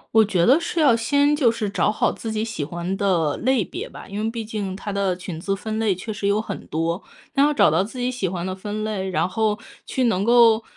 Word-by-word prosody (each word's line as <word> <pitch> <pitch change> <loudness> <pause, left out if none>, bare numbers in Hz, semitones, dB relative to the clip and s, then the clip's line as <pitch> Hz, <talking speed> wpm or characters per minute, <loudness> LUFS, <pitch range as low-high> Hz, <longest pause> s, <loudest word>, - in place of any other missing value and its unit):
我 220 - +8
觉 185 -5 +1
得 275 +7 +6
是 340 0 -3
要 275 -7 +5
先， 285 +5 +2
就 255 -6 +3
是 225 -2 -3
找 200 - +1
好 215 - +1
自 225 - -6
己 220 +1 -1
喜 220 -9 -4
欢 175 +5 -3
的 170 -7 +1
类 255 -5 +1
别 - - -6
吧， - - -11
因 205 +2 -4
为 225 - 0
毕 225 -1 -5
竟 205 -4 -4
它 205 +2 -5
的 195 -2 0
裙 180 -3 -6
子 195 +3 -1
分 215 +2 -4
类 215 -4 +2
确 215 +4 -6
实 200 -1 -2
有 200 +1 +2
很 220 - -6
多。 165 +4 -1 0.3
那 275 - +2
要 295 - +4
找 285 - +4
到 165 +4 +3
自 230 +5 -9
己 250 +1 -1
喜 205 -7 -2
欢 175 0 -4
的 185 - -3
分 210 +2 -5
类， 195 -3 -2
然 185 - +1
后 210 +2 0 0.3
去 260 - -1
能 210 -5 +2
够， 230 -1 +5
210 Hz, 275 characters per minute, -23 LUFS, 190-230 Hz, 0.3 s, 我